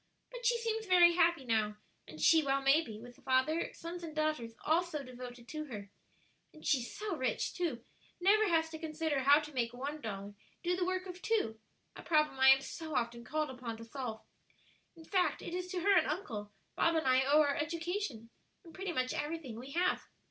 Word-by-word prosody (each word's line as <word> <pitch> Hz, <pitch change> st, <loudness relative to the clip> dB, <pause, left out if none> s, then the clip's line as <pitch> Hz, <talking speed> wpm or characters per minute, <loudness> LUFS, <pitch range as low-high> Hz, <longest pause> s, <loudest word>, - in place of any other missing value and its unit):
But -, -, -2 dB
she 475 Hz, 0 st, +3 dB
seems 445 Hz, -2 st, -2 dB
very 350 Hz, -2 st, +7 dB
happy 340 Hz, -5 st, +3 dB
now, 215 Hz, -3 st, +1 dB, 0.3 s
and 155 Hz, -, -11 dB
she 325 Hz, -, +6 dB
well 275 Hz, -2 st, +1 dB
may 275 Hz, +4 st, +5 dB
be, 220 Hz, -8 st, -8 dB
with 245 Hz, +1 st, -13 dB
father, 265 Hz, +6 st, +1 dB
sons 345 Hz, +1 st, -7 dB
and 320 Hz, -2 st, -7 dB
daughters 305 Hz, -7 st, -1 dB
all 320 Hz, +3 st, +4 dB
so 315 Hz, -5 st, -5 dB
devoted 250 Hz, -1 st, -9 dB
to 305 Hz, -1 st, -4 dB
her. 205 Hz, -7 st, -8 dB, 0.6 s
And 310 Hz, -, -15 dB
she's 250 Hz, -5 st, +1 dB
so 415 Hz, -4 st, -2 dB
rich 260 Hz, -6 st, -1 dB
too; 315 Hz, -10 st, -3 dB, 0.3 s
never 415 Hz, +4 st, +4 dB
has 320 Hz, -1 st, +2 dB
to 320 Hz, -, -7 dB
consider 315 Hz, -2 st, -1 dB
how 280 Hz, +3 st, +6 dB
to 300 Hz, 0 st, -9 dB
make 240 Hz, -2 st, -1 dB
one 285 Hz, +4 st, -5 dB
dollar 200 Hz, -2 st, -5 dB, 0.3 s
do 355 Hz, 0 st, +1 dB
the 360 Hz, 0 st, 0 dB
work 370 Hz, 0 st, -1 dB
of 365 Hz, -1 st, -8 dB
two; 365 Hz, -, 0 dB, 0.4 s
a -, -, -9 dB
problem 305 Hz, -4 st, +2 dB
I 265 Hz, 0 st, +8 dB
am 270 Hz, 0 st, +7 dB
so 315 Hz, +1 st, -6 dB
often 235 Hz, 0 st, -1 dB
called 305 Hz, +4 st, -2 dB
upon 245 Hz, -3 st, -6 dB
to 230 Hz, -, -9 dB
solve. 230 Hz, -2 st, -5 dB, 0.7 s
In 325 Hz, -1 st, -14 dB
fact, 370 Hz, 0 st, +1 dB
it -, -, -6 dB
is 360 Hz, 0 st, -3 dB
to 365 Hz, -1 st, -3 dB
her 400 Hz, +2 st, +4 dB
and -, -, +4 dB
uncle, 210 Hz, -, -4 dB, 0.2 s
Bob 335 Hz, -, +3 dB
and 320 Hz, -, +1 dB
I 260 Hz, 0 st, +5 dB
owe 290 Hz, +3 st, +5 dB
our 285 Hz, -2 st, +2 dB
education, 325 Hz, -, -3 dB, 0.3 s
and 335 Hz, -3 st, -14 dB
pretty 380 Hz, -1 st, -4 dB
much 255 Hz, -3 st, 0 dB
everything 295 Hz, -7 st, -4 dB
we 260 Hz, +3 st, -9 dB
have. 360 Hz, +2 st, +1 dB
305 Hz, 205 wpm, -33 LUFS, 250-345 Hz, 0.7 s, I